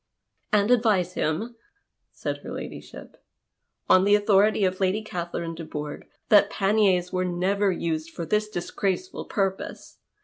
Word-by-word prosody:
" - - -51
And 210 +1 +3
advise 210 -7 +3
him," 205 +12 -2 0.5
said - - -5
her - - -9
ladyship, - - -9 0.3
" - - -54
on 185 - +6
the 205 +1 +5
authority 205 0 +3
of 185 0 -1
Lady 195 +3 +1
Catherine 170 -4 -4
de 165 - -7
Bourgh, 150 -1 -6 0.2
that 205 -1 +6
paniers 195 -4 +2
were 185 0 +1
never 190 +3 +1
used 165 -2 -2
for 165 0 -6
this 210 +5 0
disgraceful 200 - -3
purpose. 195 -3 -3
190 Hz, 145 wpm, -25 LUFS, 175-210 Hz, 0.5 s, on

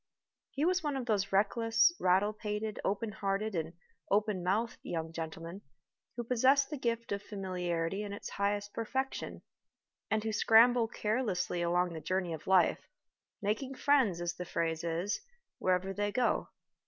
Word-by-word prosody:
He 285 +3 -1
was 370 +1 +2
one 295 -4 -1
of 255 - -3
those 205 -4 0
reckless, 225 - +3
rattle 190 +3 +3
pated, 210 0 -4
open 210 +2 -1
hearted, 200 +1 -1
and 165 -1 -2 0.4
open 205 -2 +1
mouthed 215 +6 0
young 165 -1 -4
gentlemen 165 +3 -6 0.6
who 240 - -2
possess 260 +4 +4
the 300 - -5
gift 230 -2 -2
of 200 0 -1
familiarity 185 -3 -2
in 205 -1 -5
its 200 - -6
highest 205 +1 -1
perfection, 265 +4 -3 0.7
and 220 -1 +1
who 220 -1 -2
scramble 230 +2 +6
carelessly 210 -6 -1
along 175 +1 +1
the 160 - -6
journey 185 -1 -1
of 155 - -8
life, 185 -2 +3 0.6
making 255 +7 -1
friends, 255 -12 +3
as 175 0 -1
the 180 - -6
phrase 165 -2 -2
is, 170 +5 -1 0.4
wherever 185 +1 +1
they 205 +1 -1
go. 250 +2 +1
205 Hz, 155 wpm, -32 LUFS, 180-230 Hz, 0.7 s, scramble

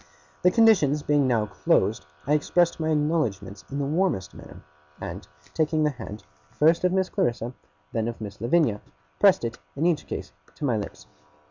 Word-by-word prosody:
The 180 - +5
conditions 180 -10 +4
being 145 -2 +2
now 115 -4 +2
closed, 75 -6 0 0.2
I 145 - +1
expressed 170 +4 +2
my 160 0 -1
acknowledgements 145 - -1
in 140 - -4
the 140 - -1
warmest 155 - 0
manner; - - -13 0.4
and, 95 -1 -7 0.3
taking 155 -1 +1
the 150 - +2
hand, 110 -5 -9 0.3
first 165 +4 +3
of 180 - +3
Miss 190 0 +1
Clarissa, 120 -1 0
and 120 - -6 0.4
then 115 0 0
of 115 - -5
Miss 105 -1 -8
Lavinia, 120 -4 +2 0.4
pressed 195 -11 +5
it, 115 0 -5 0.2
in 150 +4 -1
each 175 -3 +1
case, - - -5 0.2
to 150 - -4
my 125 -4 +2
lips. 105 -2 -6
145 Hz, 175 wpm, -25 LUFS, 110-165 Hz, 0.4 s, The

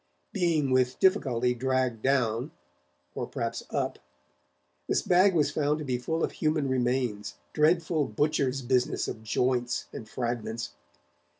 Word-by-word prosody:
Being 165 -8 +1
with 130 0 +2
difficulty 125 - +2
dragged 130 -2 0
down 125 -1 +1 0.6
or - - -4
perhaps - - -3
up - - -2 0.9
this - - +2
bag 185 +1 +4
was 150 -3 +3
found 150 0 +1
to 155 - -5
be 125 -2 -1
full 160 +6 -2
of - - 0
human 155 -2 0
remains, 125 -5 -1 0.2
dreadful 160 0 +2
butcher's 135 +2 0
business 125 0 +1
of 110 - -5
joints 125 +2 0
and 110 - -8
fragments. 115 - -3
130 Hz, 130 wpm, -28 LUFS, 120-155 Hz, 0.9 s, bag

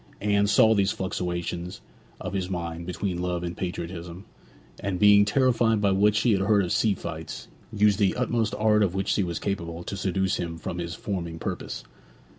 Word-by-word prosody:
Anne 100 0 +2
saw 110 +2 +5
these 100 -2 +2
fluctuations 90 -1 -3 0.4
of - - -5
his 95 -2 -2
mind 85 -2 -4
between 90 -1 -3
love 90 -1 -2
and 85 0 -4
patriotism, 90 0 -5 0.5
and 100 -2 -2
being 105 +1 +6
terrified 115 -1 +2
by 100 -1 +2
what 105 +2 +3
she 115 +3 +3
had 100 -2 +2
heard 100 0 +3
of 85 - -4
sea 105 -3 +2
fights, 80 -2 -7 0.2
used 105 -2 +3
the 100 -3 +2
utmost 120 -3 0
art 105 0 +3
of 95 -3 +1
which 95 0 -1
she - - +2
was 85 -3 -2
capable 85 -4 -4
to 100 - -5
seduce 95 -1 0
him 85 -2 -4
from 85 +2 -5
his 85 -1 -4
forming 85 -5 -4
purpose. - - -5
95 Hz, 185 wpm, -26 LUFS, 85-105 Hz, 0.5 s, being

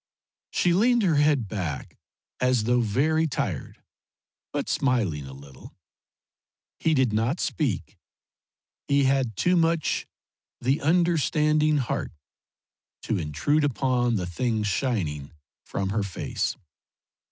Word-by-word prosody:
She 175 - +2
leaned 235 +5 +3
her 165 -6 +3
head 145 -6 +3
back 90 -10 -4 0.4
as 125 -3 +2
though 120 +2 +2
very 150 +9 +1
tired, 145 - -4 0.7
but - - -2
smiling 100 - 0
a - - -9
little. 70 -1 -13 1.0
He 160 -1 +2
did 130 -5 +2
not 115 +10 0
speak; 135 - -2 0.9
he 140 0 +3
had 130 -4 +1
too 180 - +2
much 165 -2 +1 0.5
the 135 +6 0
understanding 155 -2 +2
heart 130 -4 -2 0.9
to 110 - -1
intrude 85 - 0
upon 125 -3 +1
the 90 -4 -1
things 110 +5 -1
shining 90 - -2 0.3
from 95 -1 -3
her 105 +2 0
face. 100 -3 -3
130 Hz, 115 wpm, -26 LUFS, 105-155 Hz, 1.0 s, leaned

